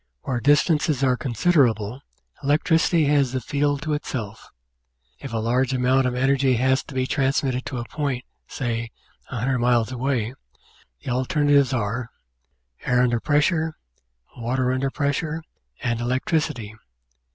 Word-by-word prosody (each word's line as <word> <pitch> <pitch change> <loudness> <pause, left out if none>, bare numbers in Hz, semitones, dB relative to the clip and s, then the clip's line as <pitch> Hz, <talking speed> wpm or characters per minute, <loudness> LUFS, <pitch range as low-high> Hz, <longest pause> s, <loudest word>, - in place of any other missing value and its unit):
Where 125 -2 -2
distances 145 +1 +2
are 130 -2 +3
considerable, 125 -4 +1 0.4
electricity 155 +3 +2
has 140 -3 +2
the 130 - 0
field 145 +3 -1
to 155 -2 -1
itself. 115 -7 -5 0.7
If 135 - -7
a 115 - -2
large 125 +4 +1
amount 130 +1 +3
of 125 - -2
energy 135 0 +2
has 130 +2 +2
to 135 - -11
be 130 -1 +1
transmitted 135 -1 0
to 130 - -4
a 120 - -4
point, 135 -2 -3 0.2
say, 115 -2 -3 0.4
100 125 +1 -1
miles 120 -1 +2
away, 125 -2 -1 0.7
the - - -3
alternatives 140 +2 +2
are: 115 0 -2 0.7
air 125 0 +3
under 120 -2 +2
pressure, 160 +3 +1 0.6
water 125 +2 0
under 135 +1 0
pres 140 0 0
sure, 160 +1 -4 0.4
and 115 -1 0
electricity. 130 -2 -1
130 Hz, 135 wpm, -23 LUFS, 120-145 Hz, 0.7 s, are